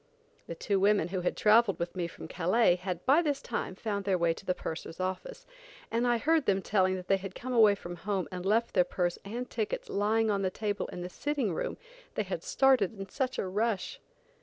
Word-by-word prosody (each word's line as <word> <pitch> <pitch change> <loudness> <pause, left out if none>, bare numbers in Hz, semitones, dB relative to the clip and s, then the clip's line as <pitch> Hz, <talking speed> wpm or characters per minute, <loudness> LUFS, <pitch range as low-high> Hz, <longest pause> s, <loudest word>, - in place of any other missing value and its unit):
The 170 - -5
two 195 +3 0
women 200 -3 +3
who 185 0 -2
had 180 - -1
traveled 215 -1 +5
with 170 +2 -4
me 175 -2 -1
from 165 - -10
Calais, 180 +3 +3
had 180 -1 -5
by 285 +6 +5
this 290 -4 0
time 185 - -4
found 200 -1 -3
their 195 -1 +1
way 170 -1 +2
to 165 - -12
the 185 -2 -1
purser's 160 +1 -6
office, 185 - -4 0.5
and 235 +2 +1
I 240 -1 +3
heard 315 +3 +2
them 195 -1 +3
telling 190 -2 +2
that 180 -1 -7
they 195 - +4
had 190 -1 -8
come 255 +1 -5
away 215 -4 +6
from 175 -3 -8
home 195 0 -2
and 180 -1 -5
left 220 +4 +1
their 180 - +5
purse 175 0 -2
and 235 +5 -5
tickets 220 -3 -3
lying 215 +2 +2
on 200 -1 0
the 190 - +1
table 205 +1 -3
in 180 - -7
the 180 - -5
sitting 275 - -1
room, - - -3 0.4
they - - 0
had - - -4
started 255 -7 +3
in 195 -1 -6
such 260 +2 -2
a - - -1
rush! 210 +2 -1
200 Hz, 225 wpm, -30 LUFS, 185-230 Hz, 0.5 s, away